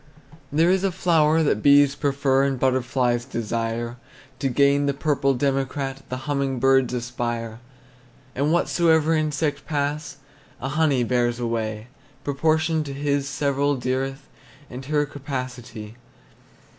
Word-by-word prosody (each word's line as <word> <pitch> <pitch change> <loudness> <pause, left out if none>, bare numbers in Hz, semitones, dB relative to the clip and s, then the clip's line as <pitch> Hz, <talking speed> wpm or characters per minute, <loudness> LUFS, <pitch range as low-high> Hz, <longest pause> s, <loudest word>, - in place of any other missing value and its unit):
There 165 +4 +3
is 190 0 +1
a 195 - +1
flower 165 -3 +3
that 105 -8 +1
bees 140 +1 +6
prefer, 140 -2 +1
And 135 -2 0
butterflies 125 -2 +1
desire; 115 -1 -3 0.4
To 135 - 0
gain 140 +2 +3
the 140 - 0
purple 140 -2 +1
democrat 135 0 -1
The 130 +1 -5
humming 140 -2 -1
birds 135 0 +3
aspire. 120 -2 -4 0.7
And 145 +4 0
whatsoever 165 -2 +3
insect 155 -1 -1
pass, 145 -1 -2 0.4
A 135 - -4
honey 145 -3 +2
bears 120 0 0
away 110 -2 -2 0.4
Proportioned 155 +2 +1
to 140 - -5
his 140 0 -1
several 140 0 0
dearth 135 +2 -3 0.4
And 125 +2 -7
her 150 +1 +1
capacity. 125 -6 -7
135 Hz, 125 wpm, -23 LUFS, 125-145 Hz, 0.7 s, bees